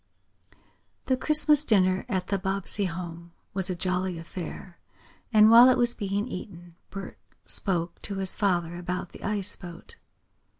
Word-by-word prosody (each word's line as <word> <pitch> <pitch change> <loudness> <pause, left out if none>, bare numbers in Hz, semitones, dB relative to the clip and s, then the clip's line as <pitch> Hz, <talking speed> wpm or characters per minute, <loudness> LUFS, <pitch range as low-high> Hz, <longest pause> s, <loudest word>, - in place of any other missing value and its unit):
The 260 - +2
Christmas 300 +2 +2
dinner 185 -7 +2
at 185 -2 -2
the 200 - 0
Bobbsey 195 +1 -1
home 170 -1 -6 0.2
was 190 -1 -1
a 185 - -1
jolly 180 0 -1
affair, 170 +2 -8 0.5
and 215 -1 +7
while 240 +2 +9
it 255 - +4
was 240 -1 +3
being 205 0 -2
eaten 175 -5 -8 0.2
Bert 195 -1 -8 0.3
spoke 175 -4 -2
to 200 - -4
his 190 -1 -2
father 175 -4 0
about 180 +1 -4
the - - -13
ice 205 -1 -1
boat. 175 - -12
190 Hz, 145 wpm, -27 LUFS, 175-210 Hz, 0.5 s, while